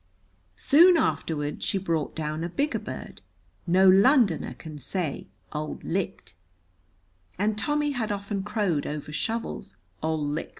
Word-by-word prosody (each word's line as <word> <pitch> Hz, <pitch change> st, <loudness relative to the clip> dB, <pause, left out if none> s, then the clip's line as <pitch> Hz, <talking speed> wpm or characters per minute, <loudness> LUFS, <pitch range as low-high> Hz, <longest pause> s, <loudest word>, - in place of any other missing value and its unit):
Soon 335 Hz, -, +6 dB
afterward 150 Hz, -, -1 dB
she -, -, 0 dB
brought 165 Hz, -5 st, -2 dB
down 155 Hz, 0 st, -3 dB
a 170 Hz, -, -2 dB
bigger 285 Hz, -, -1 dB
bird. -, -, -8 dB, 0.5 s
No 185 Hz, +2 st, +5 dB
Londoner 200 Hz, -, +4 dB
can 155 Hz, -2 st, -9 dB
say 155 Hz, +2 st, -3 dB, 0.3 s
"Auld 150 Hz, 0 st, -4 dB
licht," -, -, -3 dB, 1.0 s
and 210 Hz, +3 st, +1 dB
Tommy 295 Hz, +6 st, 0 dB
had 230 Hz, -5 st, -2 dB
often 200 Hz, 0 st, -3 dB
crowed 195 Hz, -7 st, -1 dB
over 150 Hz, 0 st, -5 dB
Shovel's 220 Hz, -, -3 dB, 0.2 s
"Ol 160 Hz, 0 st, 0 dB
likt." 150 Hz, +3 st, -3 dB
185 Hz, 130 wpm, -26 LUFS, 155-220 Hz, 1.0 s, Soon